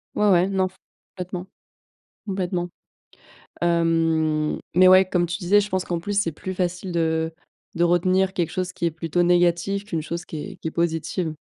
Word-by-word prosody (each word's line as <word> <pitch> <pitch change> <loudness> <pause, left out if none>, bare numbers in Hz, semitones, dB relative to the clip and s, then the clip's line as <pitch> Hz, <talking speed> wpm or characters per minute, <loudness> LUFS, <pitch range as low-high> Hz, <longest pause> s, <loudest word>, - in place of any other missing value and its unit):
Ouais, 210 0 +3
ouais 180 -1 +4
non, 190 -1 +1
f 185 - -15 0.4
complètement, 180 0 -6 0.8
complètement. 180 -3 -2 0.9
Hem, 165 -2 +1 0.2
mais 185 +1 +7
ouais, 185 +1 +7
comme 175 -1 +2
tu 175 +1 -3
disais, 200 +2 +4
je 205 0 -2
pense 185 0 -1
qu'en 175 -1 -2
plus 205 +3 -1
c'est 165 -5 0
plus 185 +5 -6
facile 180 0 -2
de 160 -1 0 0.4
de 170 - +2
retenir 185 +2 +2
quelque 170 -4 -1
chose 185 0 -3
qui 170 - -3
est 170 - +1
plutôt 165 +2 -1
négatif 175 +3 +2
qu'une 165 -6 -3
chose 170 +2 -5
qui 160 - -7
est - - -7
qui - - -6
est 160 - -3
positive. 165 0 -1
175 Hz, 185 wpm, -23 LUFS, 165-185 Hz, 0.9 s, mais